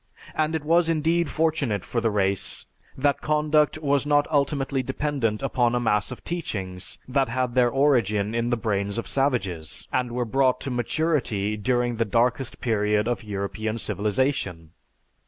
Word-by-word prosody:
And 155 +1 0
it 160 - -2
was 165 +2 +3
indeed 165 +1 +1
fortunate 150 - 0
for 120 - -1
the 115 - +2
race 100 -2 0 0.3
that 140 +1 +1
conduct 150 0 +2
was 140 -1 +2
not 145 0 +3
ultimately 140 -2 +1
dependent 130 -4 -1
upon 125 -3 +1
a - - +2
mass 105 -3 +1
of 125 - -8
teachings 95 - -4
that 135 -1 +1
had 125 0 -1
their 125 -1 +4
origin 115 -7 +2
in 115 +1 0
the 120 - +1
brains 100 -2 -1
of 115 - -2
savages, 100 - -1
and 125 -1 0
were 120 0 -1
brought 130 +2 +2
to 135 - -4
maturity 120 -5 0
during 120 +2 0
the 115 - +1
darkest 120 +3 0
period 105 -2 +1
of 120 -2 -1
European 105 +2 -3
civilization.... 105 - -1
120 Hz, 155 wpm, -25 LUFS, 105-140 Hz, 0.3 s, their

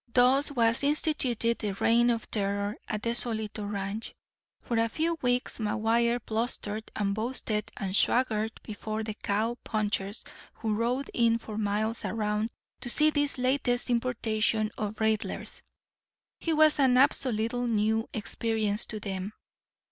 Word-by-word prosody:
Thus 260 +4 +4
was 230 -2 +2
instituted 270 -6 +1
the 210 -3 -2
reign 235 +4 +3
of 230 -2 -1
terror 200 0 -1
at 210 -1 -3
the 230 - +1
Solito 220 -3 -2
Ranch. 200 +2 -4 0.5
For 235 -2 0
a 230 0 +2
few 330 +7 0
weeks 245 -1 +1
McGuire 230 +2 +1
blustered 220 -1 -1
and 200 -2 0
boasted 220 -1 -2
and 195 -1 -2
swaggered 225 -2 +2
before 215 +1 -4
the 215 0 -4
cow 215 +4 -1
punchers 210 -1 -2 0.3
who 220 -2 -2
rode 245 +5 -1
in 230 -1 +3
for 220 -2 -8
miles 215 +2 -1
around 210 +1 -1 0.3
to 245 - -3
see 305 +5 +4
this 290 -2 +1
latest 250 -1 +1
importation 225 -3 +1
of 210 0 -3
Raidler's. 220 -1 -1 0.8
He 330 - -1
was 310 -1 +4
an 260 -2 +4
absolutely 245 -3 +2
new 220 +1 +1
experience 220 -1 0
to 215 - -4
them. 195 0 -4
225 Hz, 140 wpm, -28 LUFS, 215-245 Hz, 0.8 s, Thus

